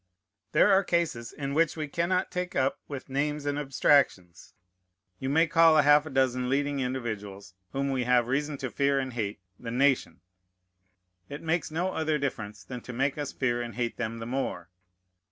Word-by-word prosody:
There 205 - +5
are 195 +1 +5
cases 165 -11 -1
in 140 -1 -4
which 165 +1 +2
we 155 -1 -3
cannot 170 +5 0
take 180 0 -3
up 135 0 +1
with 140 -2 -7
names 145 +2 -2
and 145 0 -1
abstractions. 135 -10 +1 0.6
You 130 - -3
may 160 +4 +4
call 165 -1 +5
half 145 +1 +5
a - - -5
dozen 130 -2 +1
leading 140 +1 0
individuals, 105 -7 -4 0.2
whom 140 0 -1
we 130 -2 -1
have 125 -1 +3
reason 145 +4 -1
to 125 - -4
fear 140 -1 +1
and 130 -2 -2
hate, 105 -3 -3 0.2
the 120 - -6
nation. 135 +2 +1 1.1
It 145 +2 -7
makes 165 +1 0
no 175 +4 -1
other 155 -1 0
difference 110 -7 -4
than 125 -2 -7
to 125 - -8
make 135 +3 0
us 145 - -3
fear 120 -2 -1
and 120 -3 -6
hate 120 -1 -2
them 115 -1 -3
the 115 - -6
more. 120 -9 -3
135 Hz, 180 wpm, -28 LUFS, 120-150 Hz, 1.1 s, There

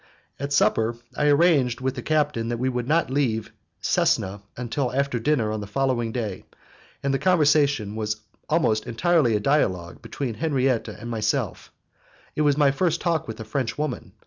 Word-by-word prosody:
At 140 +1 -4
supper 115 -4 +2 0.2
I 150 - +1
arranged 145 -6 +4
with 130 0 -1
the 130 - -6
captain 145 -6 0
that 120 - -1
we 130 +2 0
would 125 -1 -3
not 160 -2 +2
leave 115 -6 0 0.3
Cesena 100 +2 +1 0.3
till 135 -4 0
after 140 -2 0
dinner 115 -4 +1
on 110 -1 -3
the 100 - -6
following 120 0 0
day, 110 -6 -4 0.6
and 140 0 +1
the 135 - +1
conversation 145 - +3
was 105 -1 -1 0.3
almost 115 -10 +1
entirely 140 -1 +2
a - - +2
dialogue 95 - 0
between 130 -5 -4
Henriette 130 -1 0
and 115 +3 -7
myself; 110 -2 -2 0.6
it - - 0
was 145 -1 +3
my 145 -2 +5
first 170 +3 0
talk 165 -4 0
with 110 - -7
a - - -7
French 115 0 -2
woman. 150 -4 -4
130 Hz, 170 wpm, -24 LUFS, 110-145 Hz, 0.6 s, my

